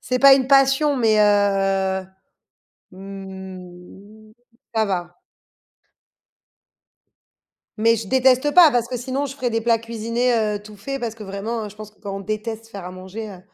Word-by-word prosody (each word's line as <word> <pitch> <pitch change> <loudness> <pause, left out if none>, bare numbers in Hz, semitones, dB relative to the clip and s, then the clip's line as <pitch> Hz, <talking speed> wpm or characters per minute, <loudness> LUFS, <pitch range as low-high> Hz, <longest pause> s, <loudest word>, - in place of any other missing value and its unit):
C'est 255 0 -2
pas 275 +1 +8
une 265 -1 0
passion 275 +2 +4
mais 220 -3 +3
heu, 195 -2 +2 0.9
mmh, 190 +2 -11 0.4
ça 220 -1 +2
va. 175 -3 -3 2.6
Mais 230 +2 +3
je 220 -2 -6
déteste 260 +4 +3
pas 345 -4 +8
parce 240 -2 0
que 250 0 -4
sinon 265 +3 -3
je 275 -1 -7
ferai 250 -3 -2
des 225 -1 -1
plats 230 0 +3
cuisinés, 230 +2 -1
heu, 210 -2 -1
tout 210 0 -13
faits, 275 +7 -5
parce 230 -3 -4
que 220 - -10
vraiment 210 +2 -4
je 200 - -16
pense 215 0 -10
que 210 - -32
quand 200 -2 -6
on - - -7
déteste 215 +2 -5
faire 200 -5 -9
à 180 - -7
manger, 190 +4 -8
heu, 190 -3 -11
215 Hz, 165 wpm, -21 LUFS, 195-245 Hz, 2.6 s, pas